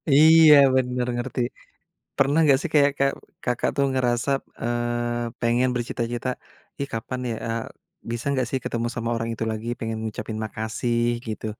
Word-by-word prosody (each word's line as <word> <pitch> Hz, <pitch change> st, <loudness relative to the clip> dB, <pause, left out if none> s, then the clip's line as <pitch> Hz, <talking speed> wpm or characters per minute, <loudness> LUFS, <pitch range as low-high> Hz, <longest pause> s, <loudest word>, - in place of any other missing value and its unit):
Iya 160 Hz, 0 st, +8 dB, 0.2 s
bener 125 Hz, -1 st, 0 dB
ngerti, 125 Hz, +1 st, -3 dB, 0.8 s
pernah 140 Hz, +3 st, +3 dB
enggak 140 Hz, -3 st, +5 dB
sih 170 Hz, -, -3 dB
kayak 145 Hz, -1 st, +5 dB
kek 140 Hz, 0 st, +3 dB, 0.3 s
Kakak 125 Hz, -1 st, 0 dB
tuh 140 Hz, -, +3 dB
ngerasa, 125 Hz, 0 st, 0 dB, 0.3 s
eee, 120 Hz, 0 st, -1 dB, 0.2 s
pengen 120 Hz, +2 st, +2 dB
bercita-cita, 120 Hz, 0 st, -3 dB, 0.5 s
"Ih, 140 Hz, -, -2 dB
kapan 115 Hz, +3 st, -4 dB
ya 115 Hz, -, -1 dB
eee, 115 Hz, 0 st, -2 dB, 0.5 s
bisa 120 Hz, 0 st, -4 dB
nggak 130 Hz, -3 st, 0 dB
sih 135 Hz, -, 0 dB
ketemu 115 Hz, 0 st, -2 dB
sama 115 Hz, -1 st, -3 dB
orang 115 Hz, 0 st, -2 dB
itu 115 Hz, -, -3 dB
lagi 110 Hz, +2 st, -5 dB
pengen 110 Hz, -1 st, -3 dB
ngucapin 110 Hz, 0 st, -5 dB
makasih 115 Hz, +2 st, -1 dB, 0.2 s
gitu. 110 Hz, 0 st, -4 dB
120 Hz, 155 wpm, -24 LUFS, 115-130 Hz, 0.8 s, Iya